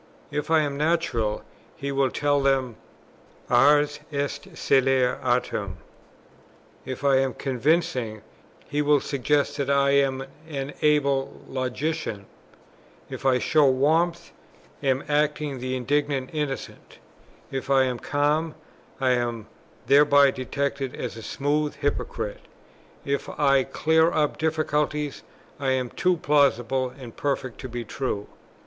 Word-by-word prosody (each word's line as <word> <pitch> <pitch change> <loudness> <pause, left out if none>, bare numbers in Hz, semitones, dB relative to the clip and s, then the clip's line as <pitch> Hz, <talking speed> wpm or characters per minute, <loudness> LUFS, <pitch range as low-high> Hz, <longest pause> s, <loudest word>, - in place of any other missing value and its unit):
If 150 +2 -3
I 160 -1 +5
am 145 -2 -2
natural, 150 -9 0 0.3
he 140 0 -4
will 135 -1 +2
tell 145 +1 +1
them 135 -4 +1 0.8
"Ars 145 +4 +4
est 145 +6 -3
celare 130 -3 +2
artem;" 125 0 -1 1.1
if 130 +1 -6
I 140 -1 +4
am 135 -1 0
convincing, 130 -5 0 0.4
he 145 +1 -1
will 145 0 +4
suggest 145 +2 0
that 140 -1 -2
I 140 0 +3
am 135 -1 +2 0.2
an 140 -1 -4
able 140 -3 +1
logician; 130 -4 -3 0.9
if - - -3
I 130 -1 +4
show 150 +3 +3
warmth, 165 +6 +1 0.5
I 140 - -3
am 130 0 +2
acting 150 -2 0
the 130 +1 -3
indignant 140 +1 -1
innocent; 150 -3 -5 0.5
if 135 0 -4
I 135 -1 +5
am 125 -2 -2
calm, 150 +2 0 0.4
I 130 -1 +2
am 120 -3 -1 0.4
thereby 145 -1 +6
detected 135 +1 -3
as 125 - -5
a 115 - -8
smooth 145 +5 -1
hypocrite; 120 -7 -3 0.6
if 140 0 -2
I 140 -2 +2
clear 160 +1 +2
up 150 -3 0
difficulties, 150 -2 -1 0.4
I 135 -2 +1
am 130 -2 -2
too 180 -1 +1
plausible 135 -5 +2
and 125 -3 -11
perfect 135 -4 -2
to 130 - -6
be 120 0 -5
true. 105 -3 -3
140 Hz, 130 wpm, -25 LUFS, 130-150 Hz, 1.1 s, thereby